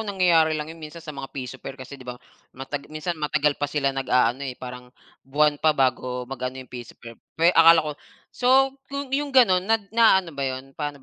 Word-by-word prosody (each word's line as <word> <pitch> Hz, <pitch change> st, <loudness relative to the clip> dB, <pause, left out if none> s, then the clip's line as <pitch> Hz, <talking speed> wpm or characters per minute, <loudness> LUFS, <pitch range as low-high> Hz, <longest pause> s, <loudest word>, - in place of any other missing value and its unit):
nangyayari 175 Hz, -6 st, +2 dB
lang 150 Hz, -, -3 dB
'yon 165 Hz, -, -15 dB
minsan 155 Hz, +1 st, -10 dB
sa 155 Hz, -, -7 dB
mga 135 Hz, -1 st, -7 dB
pa -, -, -41 dB
piso 130 Hz, 0 st, -5 dB
fair 135 Hz, -, -8 dB
kasi 135 Hz, +1 st, -10 dB
'di 125 Hz, -, -12 dB
ba 125 Hz, -, -5 dB, 0.4 s
mata 135 Hz, +2 st, -5 dB
minsan 155 Hz, +3 st, -4 dB
matagal 150 Hz, 0 st, +1 dB
pa 145 Hz, -, 0 dB
sila 140 Hz, -1 st, 0 dB
nag-aano, 125 Hz, -2 st, +1 dB
eh, 125 Hz, -, -7 dB
parang 125 Hz, 0 st, -9 dB, 0.4 s
buwan 145 Hz, +1 st, +2 dB
pa 155 Hz, -1 st, +3 dB
bago 125 Hz, -1 st, 0 dB
mag-ano 130 Hz, 0 st, -5 dB
yung -, -, -27 dB
piso 120 Hz, -2 st, -9 dB
fair. 115 Hz, -, -11 dB, 0.4 s
Akala 165 Hz, -1 st, +7 dB
ko 150 Hz, -, -3 dB, 0.4 s
so, 265 Hz, +2 st, +3 dB, 0.2 s
kung 280 Hz, -1 st, -6 dB
'yong 285 Hz, +1 st, 0 dB
gano'n 235 Hz, -9 st, +5 dB
na 225 Hz, -, +5 dB, 0.2 s
naano 190 Hz, -7 st, +4 dB
ba 140 Hz, -1 st, -2 dB
'yon, 130 Hz, +1 st, -7 dB
paano 145 Hz, 0 st, -5 dB
145 Hz, 205 wpm, -24 LUFS, 130-170 Hz, 0.4 s, Akala